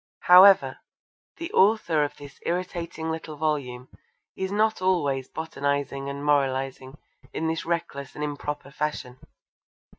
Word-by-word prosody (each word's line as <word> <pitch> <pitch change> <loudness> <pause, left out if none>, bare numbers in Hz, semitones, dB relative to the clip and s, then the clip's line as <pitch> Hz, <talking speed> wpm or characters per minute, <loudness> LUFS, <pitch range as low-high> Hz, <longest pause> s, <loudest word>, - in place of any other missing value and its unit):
However, 190 +2 +7 0.6
the 335 - -6
author 190 -6 +3
of 145 0 -4
this 145 -1 -12
irritating 170 -2 -3
little 160 -1 -6
volume 140 -5 -2 0.5
is 190 0 -3
not 215 0 +1
always 145 -8 +1
botanising 140 -3 -3
and 140 +1 -6
moralising 135 -1 0 0.4
in 160 - -3
this 160 0 -2
reckless 170 -5 -3
and 150 - -4
improper 145 -1 -5
fashion. 140 -4 -4
150 Hz, 120 wpm, -25 LUFS, 140-170 Hz, 0.6 s, However